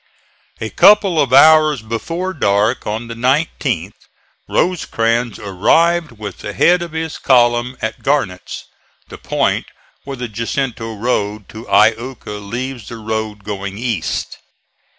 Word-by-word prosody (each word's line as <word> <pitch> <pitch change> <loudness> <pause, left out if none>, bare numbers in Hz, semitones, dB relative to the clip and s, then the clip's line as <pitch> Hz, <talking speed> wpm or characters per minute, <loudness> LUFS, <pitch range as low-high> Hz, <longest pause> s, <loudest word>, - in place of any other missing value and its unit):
A - - -4
couple 195 -6 +5
of 135 -4 0
hours 155 -2 +6
before 165 - -3
dark 105 - +1
on 110 +3 -3
the 115 - -6
19th 125 - -1 0.4
Rosecrans 120 - 0
arrived 160 - +1
with 105 -4 -8
the 105 - -6
head 175 - +4
of 170 -2 -6
his 160 -1 -4
column 120 -1 +2
at 110 0 -3
Barnets, 135 -11 -2 0.5
the - - -10
point - - 0 0.4
where 135 -1 -7
the 125 0 -4
Jacinto 115 +1 -3
road 105 -2 -2
to 110 +2 -10
Iuka 110 +1 +1
leaves 120 +3 -5
the 115 - -7
road 110 -1 -4
going 100 -1 -5
east. 115 -8 -3
115 Hz, 130 wpm, -17 LUFS, 105-140 Hz, 0.5 s, hours